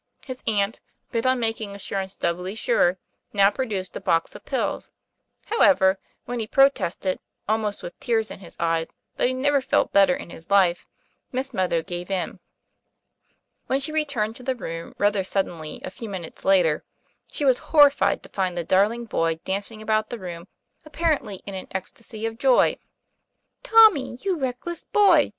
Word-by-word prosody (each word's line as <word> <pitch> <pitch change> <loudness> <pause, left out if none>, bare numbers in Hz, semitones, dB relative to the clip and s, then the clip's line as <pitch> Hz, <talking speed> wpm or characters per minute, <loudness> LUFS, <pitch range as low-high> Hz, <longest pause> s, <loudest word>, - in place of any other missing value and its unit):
His 255 -2 -7
aunt, 205 0 +1 0.3
bent 230 +2 0
on 255 0 +3
making 225 -3 -2
assur 200 0 -4
ance 190 0 -5
doubly 180 +3 -2
sure, 190 -5 +2 0.4
now 200 -1 +5
produced 205 -6 -3
a - - -5
box 165 0 +1
of - - -11
pills; - - -2 0.6
however, 195 - +4 0.3
when 245 0 -4
he 220 - -3
protested, 215 -9 +2 0.3
almost 215 -1 -1
with 175 - -8
tears 225 -3 0
in - - -8
his 180 -3 -11
eyes, 165 -1 0 0.3
that - - +2
he 255 - -1
never 280 +2 +2
felt 260 - +1
better 195 -2 +5
in - - -9
his 165 - -11
life, 190 -3 +3 0.4
Miss 265 +1 -3
Meadow 180 -4 0
gave 175 0 -6
in. 190 -2 -2 1.3
When 265 - +1
she 275 +3 -3
returned 280 -9 -1
to - - -12
the 260 +1 -1
room 165 -8 -7
rather 205 -1 +2
suddenly, 175 -5 -2
a - - -5
few 225 +2 -8
minutes 180 -5 -7
later, 175 -6 +3 0.5
she 290 - -2
was 260 -2 +4
horrified 290 -2 +5
to - - -13
find 185 -2 -2
the 170 - -1
dar 190 +4 +4
ling 235 +1 -6
boy 165 -6 0
dancing 205 +3 -2
about 215 0 +1
the 240 - -5
room, 175 -3 -8 0.4
apparently 300 - -1
in 200 - -6
an 190 - -6
ecstasy 215 +4 -6
of 225 0 -4
joy. 260 -2 +4 0.9
Tommy! 430 - +5
you 385 -2 +1
reckless 280 +4 -4
boy 370 -8 +4
215 Hz, 170 wpm, -24 LUFS, 185-260 Hz, 1.3 s, now